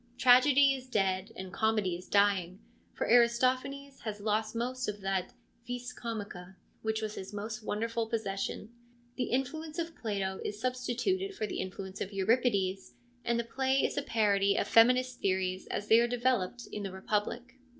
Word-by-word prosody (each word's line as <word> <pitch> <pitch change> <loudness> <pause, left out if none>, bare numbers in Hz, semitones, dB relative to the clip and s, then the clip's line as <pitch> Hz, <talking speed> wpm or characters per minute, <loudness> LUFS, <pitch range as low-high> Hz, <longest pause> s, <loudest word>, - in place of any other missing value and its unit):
Tragedy 265 +2 +6
is 260 -1 -7
dead, 195 -3 0
and 190 -1 -7
comedy 215 -5 +1
is 180 +1 -10
dying, 195 -3 +2 0.3
for - - -3
Aristo 235 +2 +5
phanes 275 +1 -9
has 210 -2 -5
lost 215 +1 -1
most 255 +2 -2
of 210 0 -3
that 195 -1 -1 0.2
' 235 0 -35
vis 245 0 -5
comica 200 -6 -6
' - - -38
which 220 0 -1
was 215 0 -3
Ms 190 +1 -6
most 215 +2 -5
wonderful 230 +2 -2
possession. 215 -1 -3 0.4
The 250 - -1
influence 305 +5 -2
of 330 -1 -3
Plato 195 -4 -3
is 205 - -4
substituted 255 - -1
for 215 - -2
the - - -4
influence 190 +1 -6
of 195 - -3
Euripides, 195 -2 +1 0.3
and 235 0 +1
the - - 0
play 265 +3 +1
is - - -2
a - - 0
parody 200 -5 +2
of - - 0
feminist 250 +2 +4
theories 185 -1 -1
as 205 - -3
they 225 - +7
are 235 - +3
developed 245 -2 0
in 210 - -4
the 195 -2 -4
Republic. 215 +6 -3
225 Hz, 175 wpm, -31 LUFS, 200-250 Hz, 0.4 s, they